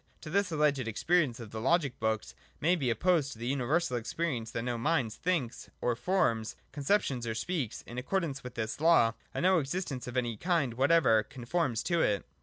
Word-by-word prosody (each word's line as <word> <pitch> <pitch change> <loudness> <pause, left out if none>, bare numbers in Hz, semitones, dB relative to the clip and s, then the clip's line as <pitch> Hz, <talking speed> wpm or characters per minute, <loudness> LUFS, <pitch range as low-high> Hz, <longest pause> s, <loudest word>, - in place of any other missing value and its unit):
To 155 - -8
this 200 0 +1
alleged 145 -5 +1
experience 135 +2 +1
of 110 -3 -9
the 110 - -5
logic 140 0 +1
books 110 -1 -1 0.3
may 175 +4 +3
be 140 -8 -1
op 115 - 0
posed 160 -8 +2
the 115 - -6
universal 135 +2 0
experience 120 -1 -2
that 115 - -3
no 120 -1 -1
mind 120 -2 0
thinks 155 -6 -2
or 120 -1 0
forms 115 - 0 0.2
conceptions 140 - 0
or 110 - -2
speaks, 135 - -3
in 120 +1 -6
accordance 140 -1 -2
with 125 -1 -8
this 110 +4 -3
law, 160 -9 +5 0.2
and - - -2
that - - +6
no 185 -2 +4
existence 140 -3 -3
of 125 0 -4
any 120 -3 -1
kind 165 - +1
whatever 135 -3 +4
con 120 +3 -10
forms 135 -6 0
to 170 -2 +1
it. 100 - +1
135 Hz, 200 wpm, -31 LUFS, 115-165 Hz, 0.3 s, that